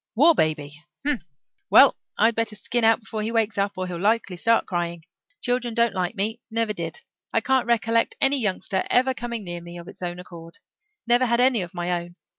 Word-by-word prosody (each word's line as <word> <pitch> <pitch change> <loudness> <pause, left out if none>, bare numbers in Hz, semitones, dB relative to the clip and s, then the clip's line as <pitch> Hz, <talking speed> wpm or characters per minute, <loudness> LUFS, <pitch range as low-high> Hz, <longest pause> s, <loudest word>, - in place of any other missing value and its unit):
"War 310 +8 +6
baby! 150 - -1 0.2
Humph! 290 -8 +1 0.5
Well, - - +7 0.2
I'd 230 +1 +4
better 225 -1 -1
skin 235 +3 -2
out 225 +1 +4
before 220 -1 -5
he 220 +2 -2
wakes 225 -3 0
up 200 0 0
or 185 - -2
he'll 175 -2 -5
likely 205 -1 +1
start 230 +6 +2
crying. 170 -2 -3 0.4
Children 245 -2 -1
don't 235 -3 +2
like 185 +2 -2
me 220 +4 -2
never 225 -1 0
did. 165 -4 -6 0.3
I - - +3
can't 260 +1 +1
recollect 230 -1 +1
any 275 +1 +3
youngster 190 -2 -1
ever 260 +1 +3
coming 235 -3 -5
near 175 -2 -6
me 170 0 -10
of 170 0 -10
its - - -11
own 175 -1 -4
accord. 170 -2 -11 0.5
Never 240 +2 +3
had 235 0 +2
any 250 -3 +3
of 175 0 -7
my 175 0 -2
own. 175 0 -12
220 Hz, 205 wpm, -24 LUFS, 175-235 Hz, 0.5 s, Well